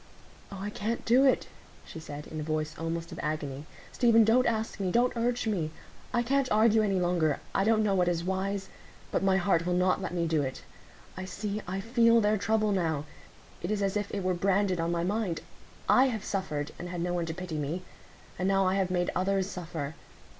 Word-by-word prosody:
"Oh, 200 - -6
I 200 +2 -4
can't 220 +3 -3
do 250 +4 +5
it," 265 - +3 0.4
she 160 - -9
said, 150 -1 -8
in 155 - -6
a - - -3
voice 155 0 -2
almost 165 0 -4
of - - -7
agony; 150 -2 -3 0.3
"Stephen, 230 -2 +5
don't 230 +4 +4
ask 220 -2 -1
me—don't 235 +7 +2
urge 235 0 0
me. 185 -8 0 0.4
I 240 -1 +1
can't 270 +2 +1
argue 220 +1 +5
any 195 -3 +1
longer,—I 175 0 0
don't 220 +1 +3
know 205 -2 +2
what 180 -2 +2
is 170 -1 0
wise; 190 +1 -2 0.4
but - - +1
my 190 -1 +3
heart 175 -3 +2
will 180 - +1
not 185 +1 +2
let 185 - -3
me 175 -1 0
do 160 -2 +1
it. 130 -2 -4 0.5
I 185 - -5
see,—I 195 0 -4
feel 230 +1 +4
their 210 -1 +2
trouble 215 +1 +1
now; 160 -6 0 0.6
it 175 - -3
is 210 -1 0
as 195 0 0
if 205 -1 -1
it 200 - -3
were 185 0 +1
branded 190 0 +1
on 165 +1 0
my 170 0 0
mind. 195 -2 -1 0.5
I 260 - +6
have 225 -6 -2
suffered, 155 -7 -2
and 175 - -5
had 175 -1 -4
no 175 +1 -1
one 170 -1 -1
to 160 - -3
pity 175 -4 -4
me; 155 +6 -3 0.6
and 185 - +1
now 195 0 +3
I 185 - +2
have 190 -2 +1
made 175 -1 0
others 190 +1 +1
suffer. 160 -5 -5
190 Hz, 210 wpm, -29 LUFS, 170-215 Hz, 0.6 s, I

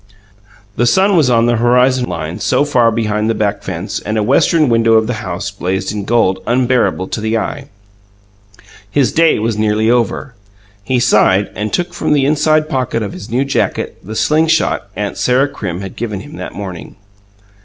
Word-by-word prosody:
The 120 - +2
sun 190 +10 +3
was 155 -7 +3
on 115 -1 +3
the 120 0 +2
horizon 125 +1 +2
line, 85 +1 -5
so 145 - +1
far 125 -5 +3
behind 110 -1 -1
the 115 - 0
back 100 -1 -1
fence, 95 -1 -5
and 110 +1 -3
a 105 - +1
western 150 +6 +3
window 115 -1 +3
of 110 0 +4
the 125 - -2
house 90 +2 -4
blazed 95 0 -3
in 105 -2 -4
gold 105 -5 +1
unbearable 120 -6 +1
to 110 - -4
the 110 +1 0
eye: 140 +5 -4 1.2
his 135 +2 +1
day 165 0 +3
was 110 0 -2
nearly 110 +1 +2
over. 120 +2 -1 0.5
He 125 +4 0
sighed, 105 -4 +3
and 105 0 -4
took 175 0 -2
from 175 - 0
the 140 -2 +2
inside 155 +1 +2
pocket 130 -6 -2
of 100 - -5
his 100 +4 -9
new 130 +4 0
jacket 135 - -2
the 110 +4 -7
"sling 150 +9 +2
shot" 160 -8 +1
aunt 105 -1 -4
Sarah 130 +3 +2
Crim 95 -9 -5
had 95 -1 -8
given 105 -4 -4
him 145 +2 -11
that - - -7
morning. 95 -4 -7
115 Hz, 185 wpm, -15 LUFS, 105-130 Hz, 1.2 s, of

